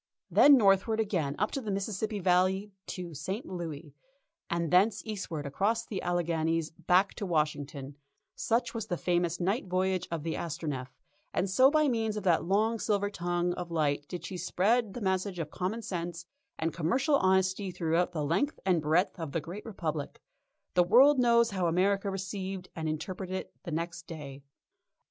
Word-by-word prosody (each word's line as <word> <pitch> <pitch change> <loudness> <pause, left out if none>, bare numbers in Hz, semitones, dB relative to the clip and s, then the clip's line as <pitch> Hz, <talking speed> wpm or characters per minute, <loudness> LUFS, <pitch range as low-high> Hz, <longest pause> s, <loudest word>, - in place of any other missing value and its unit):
Then 285 -1 +8
northward 205 +1 +3
again 175 -10 0
up 210 - 0
the 260 -7 -4
Mississippi 205 +2 -2
Valley 190 +2 +2 0.2
to 175 -2 -6
St. 190 - -4
Louis, 160 -5 -6 0.6
and 170 -2 -1
thence 200 +4 +4
eastward 185 -8 -4
across 210 +11 0
the 200 -5 -4
Alleghanies 165 -2 0
back 180 +4 +2
to 205 - -5
Washington 145 -4 -2 0.4
such 235 +1 0
was 225 -3 -4
the 175 -4 -2
famous 175 -1 0
night 195 +4 0
voyage 185 0 0
of 165 -3 -3
the 165 0 -2
Astronef, 150 -6 -4 0.5
and 190 - +1
so 255 +8 +5
by 305 0 +3
means 225 -4 0
of 210 - -4
that 175 -4 +3
long 215 +5 +1
silver 205 -1 0
tongue 175 -1 -1
of 175 -1 -6
light 145 -3 0
did 180 - -6
she 185 - -5
spread 210 +4 +1
the 245 - -5
message 190 -1 -1
of 160 -3 -4
common 205 +6 -3
sense 175 -2 -4 0.3
and 165 0 -1
commercial 255 - +2
honesty 190 -1 +2
throughout 175 0 0
the 155 -4 -2
length 190 - 0
and 180 -4 +3
breadth 165 +5 +1
of 160 -4 -5
the 165 - +1
Great 175 +8 -8
Republic. 160 -8 -4 0.5
The 180 - +5
world 260 +9 +6
knows 235 -2 +4
how 185 -3 0
America 195 +4 +2
received 190 -1 -5
and 160 -1 -2
interpreted 185 +4 -4
it 190 - -5
the 170 - -5
next 170 0 -4
day. 140 -4 -8
185 Hz, 170 wpm, -30 LUFS, 165-205 Hz, 0.6 s, Then